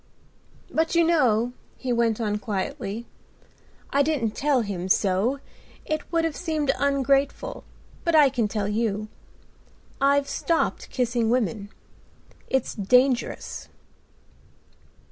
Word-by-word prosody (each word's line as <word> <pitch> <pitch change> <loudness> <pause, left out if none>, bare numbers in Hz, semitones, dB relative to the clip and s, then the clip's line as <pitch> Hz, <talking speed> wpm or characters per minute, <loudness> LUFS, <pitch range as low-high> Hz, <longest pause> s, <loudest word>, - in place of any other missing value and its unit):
"But, 325 +2 +1
you 335 - +5
know," 245 -8 +3 0.2
he 255 -2 -2
went 235 -2 +1
on 210 -2 -1
quietly, 210 +2 -4 0.9
"I 280 - +3
didn't 280 -7 +1
tell 275 +1 +1
him 190 -4 -4
so, 200 +8 +2 0.5
it 310 0 -3
would 335 -1 +2
have 320 -3 -2
seemed 310 -5 0
ungrateful, 280 - +1 0.4
but 335 -1 +2
I 295 -3 +7
can 240 -5 0
tell 205 -1 -2
you. 215 0 -1 0.9
I've 280 0 +3
stopped 330 +3 -1
kissing 235 -3 0
women; 225 -4 0 0.8
it's 265 -2 0
dangerous." 250 +5 +1
250 Hz, 110 wpm, -25 LUFS, 215-285 Hz, 0.9 s, I